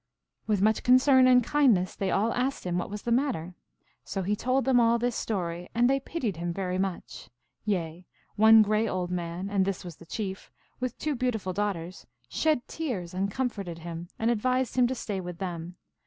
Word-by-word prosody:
With 205 -3 +1
much 220 +1 +3
con 250 - +6
cern 260 0 +5
and 250 -1 +6
kindness 235 -11 +2
they 195 - -2
all 215 +5 +1
asked 260 +2 -1
him 180 0 0
what - - -4
was 205 0 -6
the 240 - -2
matter. 235 - 0 0.5
So 195 -2 -4
he 205 +3 0
told 255 +5 0
them 260 -2 +4
all 235 0 +4
this 240 0 -1
story, 175 -4 -3
and 240 +1 +4
they 275 +1 +2
pitied 255 - -3
him 170 +1 -2
very 185 0 -2
much; 170 -10 -4 0.4
yea, 175 -4 -2 0.3
one 220 +1 +7
gray 215 +2 +1
old 180 -3 -2
man, 175 +1 -3
and 200 -1 +1
this 190 -1 -3
was 170 -4 -8
the 170 - -15
Chief, 195 -2 -5 0.3
with 255 -1 -3
two 305 - -1
beautiful 235 -7 -2
daughters, 185 -3 -3 0.2
shed 305 -6 0
tears 210 - -4
and 195 +2 -1
comforted 200 -8 -3
him, 170 +1 -7
and 225 +1 +1
advised 255 +3 0
him 250 -1 +4
to 260 - -2
stay 205 -5 -4
with 175 -1 -7
them. 175 -1 -5
205 Hz, 200 wpm, -28 LUFS, 180-245 Hz, 0.5 s, one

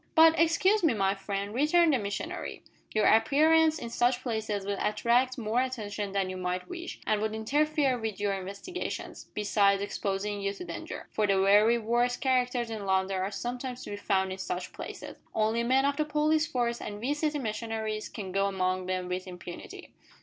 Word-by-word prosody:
"But, 325 0 +7
excuse 375 +6 +4
me, 300 -8 +4
my 195 -1 +2
friend," 200 +1 -4
returned 310 +5 +4
the 260 - +2
missionary, 200 -1 -5 0.3
"your 215 - +2
appearance 310 +8 +5
in 235 -6 -6
such 245 +1 +1
places 220 -4 -2
will 200 0 -2
attract 235 +5 +2
more 230 +1 +1
attention 210 -6 -3
than 195 -1 0
you 185 0 -5
might 180 0 -3
wish, 350 -1 -7
and 215 -1 +1
would 220 0 -1
interfere 280 +3 +1
with 220 -3 -4
your 205 -1 0
investigations, 200 - -6
besides 205 -1 +3
exposing 200 0 -2
you 200 0 -1
to 360 - -8
danger, - - -7
for 215 -1 +1
the 195 -1 +3
very 210 +4 +5
worst 240 +2 +1
characters 250 -3 +1
in 210 -3 -5
London 190 0 +1
are 190 +1 -1
sometimes 245 +4 -5
to - - -7
be - - -3
found 190 -2 0
in 190 - -6
such 180 -1 -4
places. - - -8 0.2
Only 220 +2 +2
men 260 +3 +3
of 280 0 +1
the 305 - +1
police 305 +1 +2
force 235 -1 -1
and 205 -1 -6
we 255 +6 0
city 300 0 -1
missionaries 220 -3 -3
can 195 -3 -6
go 195 +1 +2
among 185 -1 -1
them 185 -1 -2
with 185 +1 -3
impunity." 180 -1 -9
220 Hz, 185 wpm, -29 LUFS, 200-260 Hz, 0.3 s, But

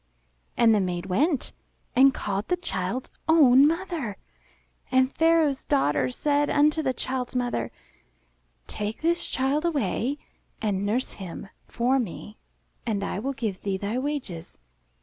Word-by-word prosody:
And 230 -2 +5
the 210 - +3
maid 180 -2 -2
went 270 - 0 0.4
and 270 +2 +7
called 200 -4 -3
the 360 - +1
child's 235 - -3 0.2
own 285 -4 +7
mother. 330 - -2 0.7
And 260 0 +3
Pharaoh's 325 -4 +3
daughter 145 - +1
said 290 - +1
unto 300 +2 +3
the 265 -4 +1
child's 255 0 -4
mother, 245 - -1 1.0
"Take 210 - -5
this 340 +1 +1
child 270 +4 0
away 280 - 0 0.4
and 200 -2 -1
nurse 245 +5 0
him 190 0 -8 0.2
for 255 +3 +1
me, 210 -1 -6 0.4
and 210 -4 -1
I 200 - -3
will 270 +5 -2
give 220 -7 -4
thee 195 -2 -1
thy 210 +5 -2
wages." 255 - -5
250 Hz, 135 wpm, -26 LUFS, 200-290 Hz, 1.0 s, and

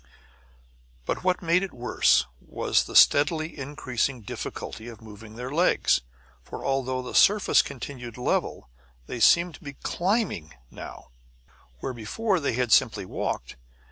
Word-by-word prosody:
But - - -3
what 185 0 +1
made 170 +2 +3
it 195 -6 -5
worse 120 - +3
was - - 0
the - - -9
steadily 155 +2 +4
increasing 135 -3 -3
difficulty 110 +2 -7
of 115 -3 -10
moving 110 0 -12
their 125 +2 -6
legs. 170 - +2 0.4
For, - - -9
although 130 -1 -1
the 125 - -7
surface 205 0 +5
continued 125 -3 -8
level, 125 - -1 0.4
they 120 - -6
seemed 170 +7 +5
to 160 - -14
be 140 -2 -7
CLIMBING 175 - -2 0.2
now, - - -10 0.7
where 130 - -3
before 185 - -1
they 140 - -1
had 125 -1 -1
simply - - +3
walked. - - -4
130 Hz, 140 wpm, -26 LUFS, 120-170 Hz, 0.7 s, surface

